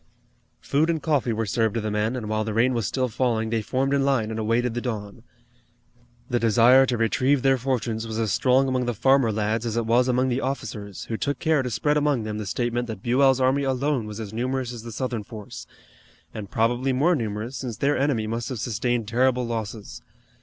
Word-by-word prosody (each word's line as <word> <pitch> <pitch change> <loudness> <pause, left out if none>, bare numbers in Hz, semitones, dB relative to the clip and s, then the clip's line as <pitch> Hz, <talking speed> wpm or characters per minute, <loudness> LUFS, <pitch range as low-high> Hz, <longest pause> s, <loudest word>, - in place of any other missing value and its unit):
Food 155 +4 +1
and 165 -1 +1
coffee 145 -6 0
were 115 0 -1
served 110 +1 0
to 115 - 0
the 105 0 -3
men, 105 +3 0
and 115 -4 -4
while 110 0 0
the 110 -1 -4
rain 125 +3 +3
was 115 -5 -1
still 130 -1 0
falling 115 -2 -1
they 115 -1 +1
formed 135 +5 -1
in 140 -1 +2
line 130 -6 +1
and 110 - -4
awaited 115 +2 0
the 120 - -3
dawn. 110 -3 -5 1.1
The 120 - 0
desire 120 +4 +5
to 125 - 0
retrieve 130 +4 +1
their 135 -1 +3
fortunes 115 -3 -2
was 110 -1 -4
as 110 -3 0
strong 130 +1 +3
among 130 -1 0
the 120 - -1
farmer 130 0 +3
lads 110 +1 -1
as 115 -1 -2
it 115 - 0
was 120 +3 +3
among 130 +1 +2
the 125 +2 -1
officers 110 -8 -5
who 110 - -3
took 145 +4 -2
care 160 -4 +2
to 125 - -3
spread 150 +6 +1
among 145 -5 +1
them 110 0 -4
the 105 - -5
statement 120 +3 -1
that 110 -4 -7
Buell's 130 +2 +3
army 130 +2 +2
alone 135 -2 0
was 105 +1 -7
as 110 -2 -6
numerous 125 +1 -2
as 120 - -7
the 115 +1 -8
Southern 120 -1 -3
force, 105 -2 -9 0.7
and 105 -3 -7
probably 120 +4 +1
more 155 +8 +3
numerous 115 0 -4
since 120 -5 -5
their 145 +1 +1
enemy 135 -6 0
must 115 +1 -3
have 130 - -4
sustained 120 0 -1
terrible 125 +2 +2
losses. 110 -2 -5
120 Hz, 215 wpm, -24 LUFS, 110-130 Hz, 1.1 s, desire